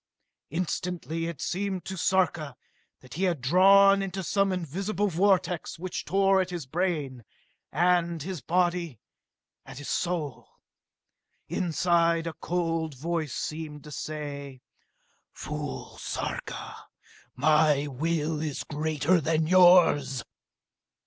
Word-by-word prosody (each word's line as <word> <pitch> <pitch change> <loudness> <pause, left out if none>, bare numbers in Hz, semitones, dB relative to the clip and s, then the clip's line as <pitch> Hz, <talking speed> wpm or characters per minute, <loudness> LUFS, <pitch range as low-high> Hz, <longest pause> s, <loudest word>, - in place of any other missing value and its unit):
Instantly 165 0 -3
it 170 -4 -6
seemed 190 0 -2
to 190 - -5
Sarka 170 -6 0 0.5
that 130 - -13
he 185 +5 0
had 175 -5 0
drawn 195 +8 +6
into 195 0 -4
some 195 +2 +1
invisible 190 +4 -2
vortex 180 -1 +1
which 180 +1 -5
tore 195 +2 +3
at 185 - -3
his 175 -5 -5
brain, 150 -5 -2 0.5
at 170 0 +1
his 180 -3 -5
body, 175 - 0 0.6
at - - -11
his 145 - -7
soul. 160 -8 -2 1.0
Inside 170 -1 +1
him 165 - -2
a - - -25
cold 165 -3 -1
voice 155 0 -3
seemed 150 -2 -5
to 150 - -11
say: 140 -3 -6 0.7
"Fool, 150 -2 -6
Sarka! - - -5 0.5
My 150 +1 +3
will 155 +2 -1
is 150 -3 -3
greater 155 +3 +1
than 160 +1 +1
yours!" 165 -8 +5
165 Hz, 115 wpm, -27 LUFS, 150-180 Hz, 1.0 s, drawn